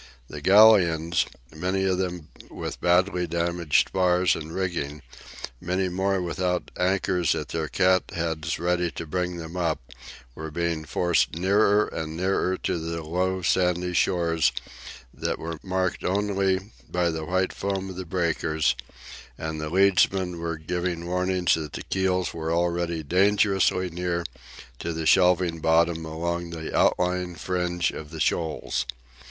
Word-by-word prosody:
The 75 Hz, -, -7 dB
galleons, 90 Hz, -4 st, +5 dB, 0.3 s
many 95 Hz, +4 st, -1 dB
of 95 Hz, -1 st, +1 dB
them 90 Hz, -4 st, -3 dB, 0.2 s
with -, -, -6 dB
badly 90 Hz, 0 st, +2 dB
damaged 85 Hz, -1 st, +1 dB
spars 90 Hz, -1 st, +3 dB
and 80 Hz, 0 st, -7 dB
rigging, 80 Hz, -5 st, -3 dB, 0.6 s
many 90 Hz, +1 st, -1 dB
more 95 Hz, +2 st, 0 dB
without 90 Hz, 0 st, -2 dB
anchors 90 Hz, -2 st, +1 dB
at -, -, -4 dB
their 80 Hz, -1 st, -2 dB
cat 95 Hz, +1 st, +3 dB
heads 80 Hz, -1 st, -2 dB
ready 90 Hz, +1 st, 0 dB
to 85 Hz, -, -6 dB
bring 90 Hz, +2 st, -2 dB
them 80 Hz, +1 st, -7 dB
up, 85 Hz, -4 st, 0 dB, 0.5 s
were 80 Hz, +4 st, -6 dB
being 85 Hz, 0 st, -2 dB
forced 85 Hz, +1 st, +1 dB
nearer 100 Hz, +4 st, +3 dB
and 80 Hz, 0 st, -5 dB
nearer 95 Hz, 0 st, +1 dB
to 85 Hz, -, -2 dB
the 85 Hz, 0 st, -4 dB
low 90 Hz, +3 st, -1 dB
sandy 90 Hz, +1 st, +1 dB
shores 85 Hz, -4 st, +2 dB, 0.6 s
that -, -, -2 dB
were 80 Hz, -1 st, -6 dB
marked 95 Hz, -1 st, -1 dB
only 95 Hz, 0 st, 0 dB, 0.2 s
by 90 Hz, -1 st, +1 dB
the 80 Hz, -1 st, -4 dB
white 95 Hz, +2 st, 0 dB
foam 95 Hz, -1 st, -3 dB
of -, -, -9 dB
the 95 Hz, -, -5 dB
breakers, 80 Hz, -4 st, 0 dB, 0.6 s
and 80 Hz, -1 st, -4 dB
the 75 Hz, -, -3 dB
leadsmen 95 Hz, -1 st, +3 dB
were 85 Hz, -1 st, -3 dB
giving 85 Hz, +1 st, -3 dB
warning 90 Hz, +1 st, -1 dB
that 75 Hz, -3 st, -3 dB
the -, -, -5 dB
keels 95 Hz, -1 st, 0 dB
were 80 Hz, 0 st, -3 dB
already 85 Hz, -1 st, 0 dB
dangerously 95 Hz, +1 st, +2 dB
near 85 Hz, 0 st, -2 dB, 0.6 s
to 85 Hz, -, -3 dB
the 80 Hz, 0 st, -3 dB
shelving 90 Hz, -1 st, +4 dB
bottom 80 Hz, +1 st, +2 dB
along 85 Hz, +2 st, -3 dB
the 80 Hz, -2 st, -6 dB
outlying 90 Hz, 0 st, +1 dB
fringe 90 Hz, -1 st, -1 dB
of 80 Hz, +1 st, -8 dB
shoals. 80 Hz, -5 st, -1 dB
90 Hz, 140 wpm, -25 LUFS, 80-95 Hz, 0.6 s, galleons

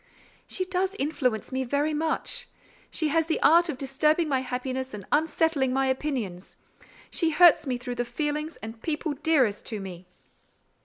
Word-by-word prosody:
"She 370 Hz, -, -2 dB
does 370 Hz, +1 st, -1 dB
influence 255 Hz, -7 st, -1 dB
me 260 Hz, 0 st, -1 dB
very 285 Hz, +4 st, 0 dB
much. 315 Hz, +1 st, -2 dB, 0.4 s
She 315 Hz, -2 st, -1 dB
has 325 Hz, +1 st, +2 dB
the 325 Hz, -, 0 dB
art 340 Hz, +2 st, +6 dB
of 290 Hz, -, -3 dB
disturbing 300 Hz, +5 st, +1 dB
my 270 Hz, -3 st, +1 dB
happiness 255 Hz, -1 st, -4 dB
and 200 Hz, -2 st, -9 dB
unsettling 315 Hz, -3 st, +2 dB
my 270 Hz, 0 st, +2 dB
opinions. 260 Hz, -9 st, -3 dB, 0.5 s
She 330 Hz, -, +2 dB
hurts 330 Hz, -1 st, +6 dB
me 250 Hz, -2 st, 0 dB
through 245 Hz, 0 st, -5 dB
the -, -, +1 dB
feelings 300 Hz, +4 st, -3 dB
and 225 Hz, +1 st, -8 dB
people 310 Hz, -1 st, -2 dB
dearest 280 Hz, -8 st, +2 dB
to 215 Hz, -, -3 dB
me." 185 Hz, -2 st, -8 dB
285 Hz, 160 wpm, -27 LUFS, 250-320 Hz, 0.5 s, art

